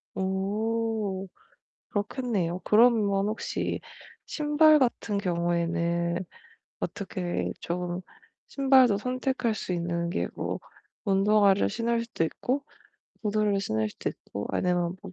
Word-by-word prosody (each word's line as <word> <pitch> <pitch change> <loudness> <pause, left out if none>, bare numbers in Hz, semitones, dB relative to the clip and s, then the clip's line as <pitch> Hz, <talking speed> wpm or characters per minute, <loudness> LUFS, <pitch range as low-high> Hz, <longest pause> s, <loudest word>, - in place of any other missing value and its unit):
오 205 +1 -1 0.6
그렇겠네요. 205 -5 -1
그러면 210 -3 +4
혹시 215 +1 -2 0.5
신발같은 295 -8 +3
경우에는 170 -1 0 0.6
어떻게 185 -3 -3
좀 175 +1 -3 0.5
신발도 265 -6 +5
선택할 255 0 -1
수 185 - -3
있는 170 0 -1
게 175 - -1
뭐 - - -3 0.4
운동화를 200 0 +4
신을 230 +2 0
수도 230 -7 -2
있고 255 - -1 0.6
구두를 210 -2 +1
신을 110 - 0
수도 - - -4
있고 100 +1 -6
아니면 175 0 0
뭐 - - -9
200 Hz, 225 characters per minute, -27 LUFS, 175-230 Hz, 0.6 s, 신발도